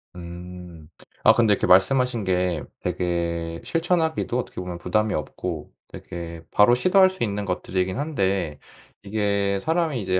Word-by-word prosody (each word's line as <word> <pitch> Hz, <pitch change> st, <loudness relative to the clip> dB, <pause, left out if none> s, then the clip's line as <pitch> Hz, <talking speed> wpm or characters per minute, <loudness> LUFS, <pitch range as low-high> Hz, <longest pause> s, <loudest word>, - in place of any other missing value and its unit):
음. 85 Hz, -2 st, -10 dB, 0.3 s
아 110 Hz, -, +8 dB
근데 110 Hz, -2 st, +4 dB
이렇게 -, -, 0 dB
말씀하신 120 Hz, +4 st, +4 dB
게 90 Hz, -3 st, 0 dB, 0.2 s
되게 85 Hz, -2 st, -2 dB
실천하기도 165 Hz, -6 st, 0 dB
어떻게 -, -, -6 dB
보면 90 Hz, -1 st, -5 dB
부담이 105 Hz, +4 st, 0 dB
없고 80 Hz, +1 st, -4 dB, 0.2 s
되게 85 Hz, -1 st, -8 dB
바로 105 Hz, +4 st, +5 dB
시도할 185 Hz, +8 st, +5 dB
수 185 Hz, -8 st, -4 dB
있는 105 Hz, -1 st, -2 dB
것들이긴 95 Hz, +2 st, -2 dB
한데 95 Hz, -, -1 dB, 0.4 s
이게 100 Hz, -1 st, 0 dB
사람이 160 Hz, -6 st, 0 dB
이제 95 Hz, -1 st, 0 dB
95 Hz, 305 characters per minute, -24 LUFS, 90-120 Hz, 0.4 s, 아